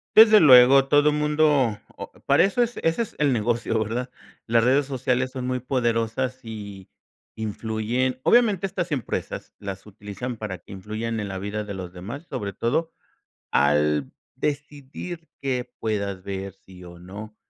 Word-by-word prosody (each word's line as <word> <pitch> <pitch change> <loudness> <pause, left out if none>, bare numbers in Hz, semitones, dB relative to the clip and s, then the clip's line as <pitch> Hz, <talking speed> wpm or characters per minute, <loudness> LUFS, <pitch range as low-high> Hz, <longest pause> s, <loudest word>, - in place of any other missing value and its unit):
Desde 215 -1 +9
luego 135 -1 +8
todo 145 +1 +5
mundo 150 -6 +2 0.2
o - - -8
para - - +5
eso 200 +6 +1
es 240 0 0
ese 165 +7 +1
es 230 - -5
el 145 -2 +2
negocio, 115 -1 0
¿verdad? 120 +4 -3 0.4
Las 115 0 +3
redes 135 +4 +3
sociales 130 -1 -1
son 130 -1 -4
muy 130 0 -1
poderosas 125 0 -1
y, 100 -4 -8 0.5
influyen 110 +4 -2
obviamente 215 -6 +4
estas 180 -3 -4
empresas 135 -6 -4
las 100 -1 -7
utilizan 105 +4 -7
para 105 -4 -5
que 90 - -13
influyan 110 +3 -4
en 100 - -4
la 95 - -4
vida 105 +2 -3
de 105 -1 -6
los 90 -2 -7
demás, 115 - -8
sobre 105 -7 -4
todo, 135 - -1 0.6
al 75 0 +2 0.2
decidir 145 +3 -5
qué 125 -3 -2
puedas 100 -3 -2
ver, 95 0 -5
sí 95 -1 -16
o 85 -1 -12
no, 105 +4 -9
120 Hz, 155 wpm, -24 LUFS, 100-140 Hz, 0.6 s, Desde